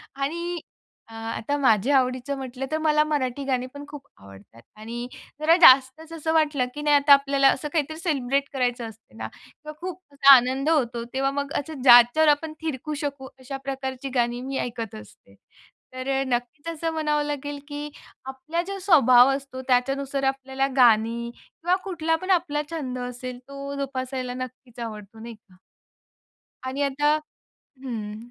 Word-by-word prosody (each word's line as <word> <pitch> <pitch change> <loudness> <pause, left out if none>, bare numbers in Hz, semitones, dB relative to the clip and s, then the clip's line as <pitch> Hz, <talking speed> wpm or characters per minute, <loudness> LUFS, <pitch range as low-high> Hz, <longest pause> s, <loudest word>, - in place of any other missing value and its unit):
आणि 340 +5 -3 0.5
अ, 225 - -15
आता 225 +5 -3
माझ्या 260 +1 +3
आवडीचं 255 +2 -1
म्हटलं 265 0 -5
तर, 315 - +1
मला 305 -1 +3
मराठी 280 -3 -2
गाणीपण 260 +2 -3
खूप 290 -2 -11
आवडतात 100 +3 -16 0.2
आणि 235 +3 -6 0.3
जरा 320 +2 +5
जास्तच 270 +4 +6
असं 320 0 -2
वाटलं 300 -5 +2
की 295 - -5
नाही 295 0 +3
आता 285 0 +6
आपल्याला 275 0 +4
असं 300 - -3
काहीतरी 315 -1 -1
सेलिब्रेट 280 -5 0
करायचं 245 -3 -1
असते 220 - -19
ना, 110 0 -5 0.4
तर 305 - -6
खूप 365 0 -6
असा 280 0 +8
आनंद 260 +4 +1
होतो, 240 -7 +1
तेव्हा 270 +1 0
मग 280 0 -3
असं 290 -1 -7
ज्याच्यावर 245 +4 +7
आपण 310 +2 +1
थिरकू 305 -1 -4
शकू, 280 -2 -4
अशा 265 +1 -6
प्रकारची 270 0 -4
गाणी 240 0 0
मी 265 +1 -4
ऐकत 230 -3 -5
असते. 105 -2 -15 0.6
तर 255 +1 -5 0.2
नक्कीच 245 +5 -3
असं 325 +1 -3
म्हणावं 300 -2 0
लागेल 290 0 -4
की 295 0 -6 0.4
आपला 265 +6 -3
जो 395 0 -4
स्वभाव 260 - +6
असतो, 270 -1 -7
त्याच्यानुसार 275 +2 0
आपल्याला 270 0 -3
गाणी 235 0 +3
किंवा 350 +2 -2
कुठलापण 330 -1 -2
आपला 295 -2 -3
छंद 270 -6 -4
असेल 250 0 -6
तो 280 0 -7
जोपासायला 260 -2 -4
नक्कीच 255 -1 -9
आवडतो, 215 -1 -10
नाही 230 +1 -9
का. 205 -3 -25 1.1
आणि 270 +2 -2
आता 290 +2 +2 0.4
हं. 230 -6 -7
270 Hz, 155 wpm, -24 LUFS, 245-295 Hz, 1.1 s, असा